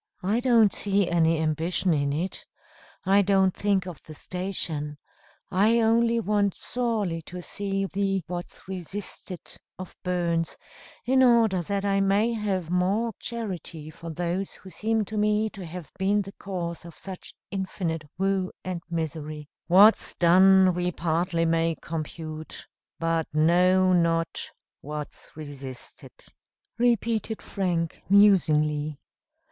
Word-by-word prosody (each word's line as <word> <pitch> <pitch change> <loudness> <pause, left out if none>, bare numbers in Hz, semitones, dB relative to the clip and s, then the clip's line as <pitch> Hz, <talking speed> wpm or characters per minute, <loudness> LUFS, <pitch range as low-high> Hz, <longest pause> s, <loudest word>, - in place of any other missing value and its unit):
"I 205 +5 +1
don't 235 -5 +4
see 200 -2 +1
any 165 -1 +3
ambition 160 +3 0
in 140 -2 0
it 170 +6 -3 0.6
I 195 +2 +5
don't 190 -1 +3
think 200 -2 +1
of 175 -6 -8
the 155 - -11
station 165 -5 -4 0.5
I 215 +5 +4
only 230 +1 +3
want 205 -2 +1
sorely 220 -9 -1
to 180 0 -7
see 195 0 -2
the 195 -1 -1
'What's 175 +1 -7
resisted' 190 0 -6 0.2
of 185 -1 -9
Burns, 170 -2 -1 0.5
in 260 +2 +4
order 230 -7 +4
that 200 +3 -2
I 195 0 +2
may 205 +4 +2
have 195 -6 -2
more 200 +6 +1
charity 180 -9 -6
for 165 +2 -9
those 175 +4 -2
who 190 - -12
seem 220 +4 0
to 215 +2 -5
me 210 +1 +2
to 195 - -9
have 170 -1 -8
been 200 +2 +2
the 195 - -9
cause 175 -4 -4
of 170 -1 -11
such 190 -2 -9 0.2
infinite 185 -4 -3 0.2
woe 190 0 0
and 180 -2 -4
misery." 155 -2 -4 0.2
"'What's 200 +6 +6
done 185 +2 +6
we 180 0 -1
partly 170 0 0
may 165 0 +1
compute; 155 0 -6 0.3
But 165 -1 0
know 180 +4 +4
not 165 -1 +1 0.3
what's 150 0 -7
resisted,'" 140 -4 -9 0.6
repeated 230 -2 +1
Frank 175 -4 -2
musingly. 155 -7 +4
185 Hz, 130 wpm, -26 LUFS, 165-200 Hz, 0.6 s, What's